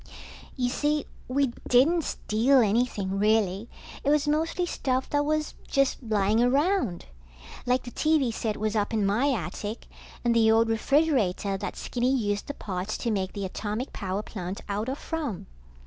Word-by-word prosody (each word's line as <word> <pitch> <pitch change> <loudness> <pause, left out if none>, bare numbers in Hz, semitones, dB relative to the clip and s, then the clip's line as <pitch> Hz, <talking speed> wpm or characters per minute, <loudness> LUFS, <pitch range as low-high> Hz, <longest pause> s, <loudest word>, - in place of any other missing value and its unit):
You 250 -2 0
see, 295 +3 0 0.2
we 265 -1 +1 0.2
didn't 310 +7 +4
steal 235 +6 +2
anything, 205 -3 0
really. 210 0 +2 0.3
It 280 - +1
was 295 0 +3
mostly 325 +4 +1
stuff 260 -6 -1
that 290 0 +2
was 305 +1 -1
just 275 0 +1
lying 215 -1 +2
around. 275 - +1 0.6
Like 250 +1 +2
the 245 - -8
TV 305 -6 +2
set 220 -1 -2
was 215 0 -1
up 210 +1 0
in 210 -2 +2
my 235 +9 +2
attic, 210 0 -4 0.4
and 235 -1 +3
the 225 -1 +5
old 225 +1 +4
refrigerator 225 - +2
that 195 - -4
Skinny 255 +2 0
used 205 -3 -1
the 285 - -5
parts 190 +1 -4
to 235 - -2
make 190 -3 -1
the 200 -2 -3
atomic 215 +6 -4
power 195 0 -3
plant 185 -2 -6
out 210 +4 -2
of 270 - -3
from. 305 - -4
230 Hz, 165 wpm, -27 LUFS, 205-280 Hz, 0.6 s, the